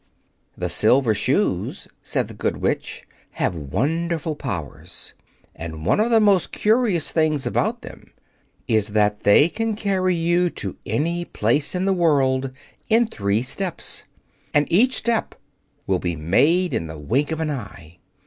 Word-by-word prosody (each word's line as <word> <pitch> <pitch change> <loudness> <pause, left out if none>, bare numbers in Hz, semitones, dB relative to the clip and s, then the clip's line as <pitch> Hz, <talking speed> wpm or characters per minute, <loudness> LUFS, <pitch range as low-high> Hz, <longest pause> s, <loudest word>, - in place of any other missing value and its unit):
"The 90 - -2
Silver 110 +7 +3
Shoes," - - 0
said - - -1
the - - -10
Good - - -2
Witch, - - -2 0.3
"have - - 0
wonderful 155 - -2
powers. 95 - -6 0.4
And 80 -1 -7
one 105 - +3
of 220 +2 +2
the 230 -1 +5
most 200 -4 +3
curious 215 - +1
things 155 -4 +1
about - - -1
them - - -12 0.6
is 110 -2 +1
that 105 0 +2
they 105 +9 +6
can 225 +4 -2
carry 190 -3 0
you 175 +1 +2
to - - -5
any 170 +3 -1
place 140 - 0
in 180 +1 0
the 195 - +3
world 135 -6 +2 0.4
in 230 +2 +5
three 100 - -1
steps, 180 +7 -4 0.5
and 150 0 +4
each 245 +9 +4
step 235 -2 -1 0.5
will 95 -2 +1
be 85 -2 -2
made 150 - +2
in 80 - -1
the 80 0 -8
wink 125 - 0
of 160 - -2
an 160 -2 -1
eye. 90 - -8
150 Hz, 150 wpm, -22 LUFS, -, 0.6 s, they